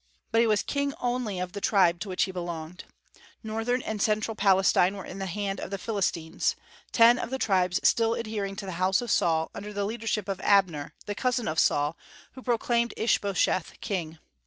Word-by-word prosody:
But 225 - +4
he 235 - +3
was 210 -2 +2
king 280 0 -1
only 245 -5 -2
of 180 0 -3
the 200 +1 -6
tribe 180 -5 +3
to 190 - -5
which 185 - +1
he 190 - -2
belonged. 175 -1 -6 0.6
Northern 225 +3 -1
and 215 -2 -3
central 215 +1 +1
Palestine 195 -2 +3
were 195 - -7
in 195 - -8
the 195 - -3
hands 195 +1 -3
of - - -5
the 195 - -3
Philistines, 185 -6 -1 0.4
ten 235 +1 +6
of - - -4
the 265 - -2
tribes 185 -6 +1
still 230 0 +3
adhering 210 -3 -3
to 200 0 -6
the 190 - -5
house 190 +1 +3
of 240 - -3
Saul, 160 -1 +2
under 210 +1 -7
the 205 -1 -2
leadership 220 -2 -2
of 195 -1 -3
Abner, 180 -8 +2
the 205 - -3
cousin 250 +1 -1
of 155 +1 0
Saul, 145 +2 +2 0.4
who 260 - -11
proclaimed 235 -1 0
Ishbosheth 200 -5 0
king. 175 -7 -4
200 Hz, 195 wpm, -27 LUFS, 185-225 Hz, 0.6 s, ten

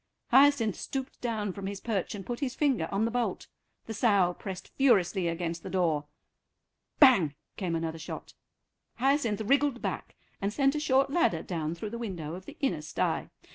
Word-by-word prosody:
Hyacinth 265 -5 +5
stooped 265 0 -5
down 215 -5 -2
from 195 0 -5
his 200 0 -5
perch 210 -3 -2
and 195 -2 -7
put 240 -1 -4
his 265 -3 -2
finger 265 - +1
on 200 +3 +1
the 230 - -1
bolt. 245 0 -1 0.4
The 225 - -5
sow 200 -6 +3
pressed 190 0 -7
furiously 195 -9 +3
against 165 0 -2
the - - -7
door. 165 -6 +1 0.9
"Bang," 200 - +6 0.2
came 180 -4 -2
another 165 0 -3
shot. 160 - -7 0.6
Hyacinth 250 -5 +1
wriggled 275 +3 +2
back, - - -4 0.3
and 200 +1 0
sent 275 +3 +2
a 300 - -1
short 270 -2 +2
ladder 280 - +2
down 165 -2 -3
through 205 +5 -6
the 235 - -5
window 175 -9 -5
of 185 +2 -9
the 295 - -10
inner 180 - 0
stye. 150 - -1
210 Hz, 175 wpm, -29 LUFS, 175-260 Hz, 0.9 s, Bang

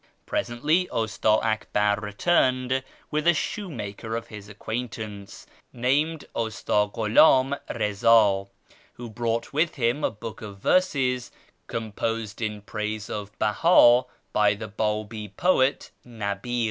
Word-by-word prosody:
Presently 155 +10 0
Usta 110 -1 -2 0.2
Akbar 105 -2 +1
returned 130 +3 +1 0.3
with 155 +2 0
a 175 - +6
shoe 200 +5 -3
maker 110 -4 -5
of 115 - -5
his 105 -1 -10
acquaintance, 110 -2 -6 0.3
named 145 +6 0
Usta 110 -2 0
GhuLim 130 +5 +4
Eiza, 105 -1 +3 0.5
who 120 -1 -9
brought 115 +2 -2
with 155 +3 +1
him 125 +3 0
a - - +3
book 110 +1 -9
of 105 -2 -8
verses 130 - +1 0.4
composed 115 0 -3
in 105 -2 -3
praise 105 -1 -4
of 105 0 -6
Behii 120 +1 +5 0.3
by 105 -1 +3
the 110 +1 -7
Babi 105 +1 -3
poet 135 - +1
JSTabi'l. 115 +1 -4
115 Hz, 120 wpm, -25 LUFS, 105-130 Hz, 0.5 s, a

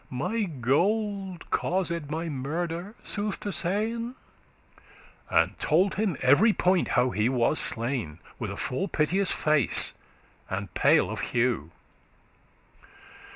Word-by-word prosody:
*stop - - -31
My 185 - -1
gold 190 - -1
caused 170 -4 -1
my 160 +2 -3
murder, 165 - -4
sooth 205 -1 -3
to 205 - -3
sayn.' 225 +7 -1 1.1
And - - +2
told 180 +6 +2
him 195 -7 -1
every 170 - +5
point 185 -2 +2
how 125 +1 +3
he 110 +2 +1
was 130 +3 +2
slain, 115 - -1 0.2
With - - -3
a - - -6
full 190 +10 -2
piteous 180 +3 +1
face, 150 -5 +3 0.6
and 100 0 -4
pale - - +3
of - - -4
hue. 120 -10 0
165 Hz, 120 wpm, -27 LUFS, 130-195 Hz, 1.1 s, every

